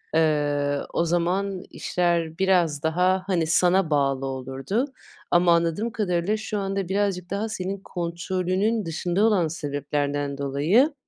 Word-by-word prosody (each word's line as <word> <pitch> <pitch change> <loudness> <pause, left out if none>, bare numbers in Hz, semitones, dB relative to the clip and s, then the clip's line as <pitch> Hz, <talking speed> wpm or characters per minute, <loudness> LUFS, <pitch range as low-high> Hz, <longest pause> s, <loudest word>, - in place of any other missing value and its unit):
eee, 145 -2 +2
o 170 - +1
zaman 180 +3 0
işler 170 -2 -1
biraz 175 -6 +2
daha, 180 +3 +2
hani, 170 -4 +1
sana 175 +1 +3
bağlı 135 -2 +1
olurdu 135 - -2 0.5
ama 175 0 +5
anladığım 170 +7 0
kadarıyla 205 -1 0
şu 215 -1 -4
anda 195 -2 -2
birazcık 190 -3 -1
daha 205 +3 -2
senin 195 -1 -3
kontrolünün 185 +4 -1
dışında 175 +4 -1
olan 200 -7 +3
sebeplerden 145 -2 -2
dolayı, 155 - +2
175 Hz, 125 wpm, -25 LUFS, 150-195 Hz, 0.5 s, ama